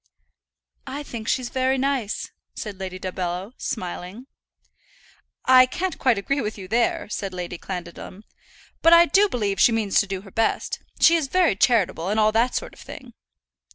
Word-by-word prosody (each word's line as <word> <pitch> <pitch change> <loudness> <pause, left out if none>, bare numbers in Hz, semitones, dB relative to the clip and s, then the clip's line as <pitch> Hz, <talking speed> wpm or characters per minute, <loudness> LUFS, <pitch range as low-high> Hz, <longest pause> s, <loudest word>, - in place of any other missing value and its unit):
"I 285 +2 -5
think 230 -5 -8
she's 255 -2 0
very 260 0 0
nice," 265 -5 -2 0.2
said 205 -3 -7
Lady 185 -1 -5
Dumbello, 185 +1 -4
smiling. 185 +3 -5 1.2
"I 255 0 +7
can't 360 +7 -3
quite 250 -4 +3
agree 275 +8 -1
with 215 -2 -4
you 190 -2 -9
there," 235 +4 0
said 195 -2 -5
Lady 175 -1 -5
Clandidlem. 180 +2 -8 0.6
"But 330 - +6
I 340 0 +8
do 400 +4 +3
believe 205 - -2
she - - +6
means 220 -3 +1
to 200 - 0
do 190 -1 -4
her 195 -1 -14
best. 225 +3 -1 0.2
She 335 - +6
is 310 -4 -2
very 360 - +2
charitable, 195 -6 +2
and 215 +2 +1
all 215 0 +4
that 230 +3 +1
sort - - -4
of - - -17
thing." - - -11
220 Hz, 170 wpm, -23 LUFS, 190-260 Hz, 1.2 s, I